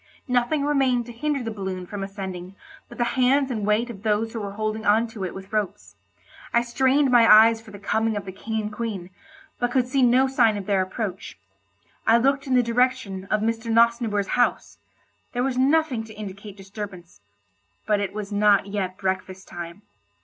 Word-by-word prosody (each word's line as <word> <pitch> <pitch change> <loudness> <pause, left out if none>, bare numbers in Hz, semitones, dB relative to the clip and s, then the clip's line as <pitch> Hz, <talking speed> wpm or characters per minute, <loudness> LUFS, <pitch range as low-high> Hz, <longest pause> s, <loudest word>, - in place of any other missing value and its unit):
Nothing 250 +4 +1
remained 265 -5 +2
to 240 - -9
hinder 280 +2 -2
the 225 - -4
balloon 190 -3 -5
from 200 +2 -6
ascending 190 -2 -7 0.3
but - - -12
the 240 - +1
hands 260 +3 +2
and 215 -4 -2
weight 215 +3 +2
of 200 -4 -11
those 220 +1 0
who 225 - -4
were 200 -1 -5
holding 215 +1 -3
on 220 +2 +3
to 215 -3 -7
it 180 - -6
with 190 +2 -10
ropes. 210 -2 -3 0.6
I 235 - +3
strained 265 +3 +2
my 235 -2 +6
eyes 225 +1 +7
for 225 - -15
the 200 - -10
coming 220 +2 0
of 200 - -5
the 190 - -6
King 220 +3 -4
and 210 0 -5
Queen, 210 -5 -5 0.5
but 245 - +1
could 250 0 +1
see 265 +1 +1
no 255 +2 +4
sign 235 -5 +3
of 200 - -6
their 195 -1 +2
approach. 190 - -5 0.7
I 225 +1 +6
looked 275 +3 +1
in 260 - +2
the 250 - +4
direction 235 -5 0
of 210 +1 0
Mr. 225 +1 -1
Nosnibor's 230 -3 +2
house—there 245 0 -3
was 260 -1 -1
nothing 280 -3 +2
to 220 - -12
indicate 200 -1 -9
disturbance, 195 - -9 0.6
but 210 -1 +2
it 200 -2 -2
was 210 0 -6
not 205 -1 +4
yet 195 -2 -3
breakfast 190 0 -3
time. 175 +3 -8
220 Hz, 190 wpm, -24 LUFS, 200-245 Hz, 0.7 s, eyes